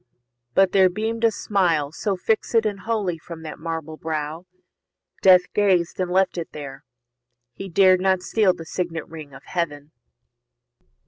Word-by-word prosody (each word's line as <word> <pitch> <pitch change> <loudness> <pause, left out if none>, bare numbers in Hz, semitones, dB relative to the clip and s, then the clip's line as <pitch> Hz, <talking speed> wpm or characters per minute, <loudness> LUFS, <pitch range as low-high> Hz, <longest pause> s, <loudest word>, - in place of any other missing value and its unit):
But 190 -1 +4
there 190 -1 +5
beam'd 225 +5 -3
a - - +6
smile 175 -9 0
So 195 +4 -2
fix'd 220 +3 +1
and 205 -2 -2
holy 200 -7 -2
from 165 0 -10
that 155 - -8
marble 160 -1 -5
brow, 160 +2 -4 0.7
Death 185 -1 +7
gazed 190 -5 +1
and 185 -1 -1
left 185 0 +1
it 165 - -7
there; 140 -2 -8 0.7
he 195 +9 -8
dared 185 +1 +5
not 190 -1 +1
steal 205 -5 +2
The 165 - -9
signet 165 -2 -4
ring 155 -3 -10
of 135 - -13
Heaven. 150 -4 -4
180 Hz, 150 wpm, -23 LUFS, 160-195 Hz, 0.7 s, Death